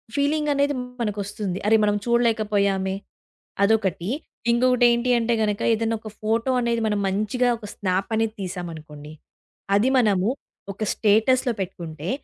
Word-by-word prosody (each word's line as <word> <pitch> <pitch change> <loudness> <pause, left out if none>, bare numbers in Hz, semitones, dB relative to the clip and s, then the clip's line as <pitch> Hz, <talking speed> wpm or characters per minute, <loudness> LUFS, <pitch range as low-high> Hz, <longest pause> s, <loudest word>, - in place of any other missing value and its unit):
Feeling 295 +1 +1
అనేది 285 0 +1 0.3
మనకొస్తుంది. 205 -3 -3
అరే! 220 +1 +6
మనం 205 0 +2
చూడలేకపోయామే, 210 -5 +1 0.7
అదొకటి. 200 -4 +1 0.4
ఇంగొకటి 250 +1 +3
ఏంటి 235 +1 0
అంటే 235 +1 +1
గనక 210 -1 -1
ఏదైనా 225 0 0
ఒక 220 - -8
ఫోటో 225 +4 0
అనేది 235 -1 0
మనం 210 -1 0
మంచిగా 215 +6 0
ఒక 220 - -11
స్నాప్ 190 -1 -1
అనేది 225 0 0
తీశామనుకోండి. 160 -5 -7 0.6
అది 225 +6 +2
మనము 205 -3 +2 0.4
ఒక 210 - -5
స్టేటస్‍లో 230 +4 +3
పెట్టుకుంటే 170 -3 -6
215 Hz, 130 wpm, -23 LUFS, 195-235 Hz, 0.7 s, అరే